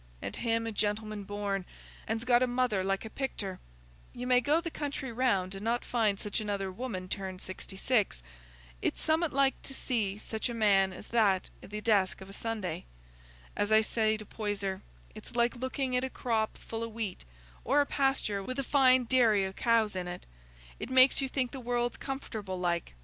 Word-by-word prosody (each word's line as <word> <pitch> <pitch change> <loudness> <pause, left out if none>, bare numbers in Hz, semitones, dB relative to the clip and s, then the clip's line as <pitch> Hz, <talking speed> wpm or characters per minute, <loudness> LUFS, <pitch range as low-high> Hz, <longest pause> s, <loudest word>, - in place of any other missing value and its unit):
And - - -5
him 230 -1 0
a 225 - -2
gentleman 210 0 -1
born, 200 -1 -2 0.4
and's 225 +1 -1
got 245 -1 +5
a 255 - +4
mother 245 -6 +1
like 195 +2 -1
a - - -5
picter. 200 -9 -3 0.6
You 245 0 -4
may 250 0 +5
go 295 +6 +3
the 335 -1 -4
country 285 -4 -4
round 200 -6 +1
and 195 +1 -6
not 235 +2 0
find 215 -4 +1
such 210 +1 -2
another 200 -2 -2
woman 185 -3 -5
turned 190 -1 -4
sixty 190 +1 -7
six. 210 - +1 0.6
It's - - -1
summat 320 0 +2
like 275 0 +2
to 270 - -8
see 210 -7 -1
such 220 +2 -3
a 240 - -4
man 195 -4 +4
as 185 - -10
that 205 -5 +2
i' - - -9
the 210 +1 -5
desk 205 -4 +2
of 190 0 -10
a - - -9
Sunday! 215 - -3 0.7
As 205 +1 0
I 220 0 +7
say 220 0 +1
to 215 - -9
Poyser, 200 -3 -3 0.3
it's - - -11
like 235 +1 +2
looking 260 +1 -2
at 250 - +2
a 265 - -1
full - - -18
crop 220 -3 0 0.2
o' 225 0 -1
wheat, 220 -4 -4 0.4
or 280 +5 +3
a 290 - +4
pasture 270 -8 +1
with 255 +6 -5
a 275 - 0
fine 260 -2 +5
dairy 225 -5 +4
o' 190 - -4
cows 225 -2 +2
in 180 -1 -3
it; 175 0 -6 0.5
it - - -5
makes 260 +1 +6
you 270 - -1
think 255 -2 0
the 270 - -6
world's 240 0 -1
comfortable 220 -8 -5
like. 170 - -1
220 Hz, 200 wpm, -31 LUFS, 195-255 Hz, 0.7 s, I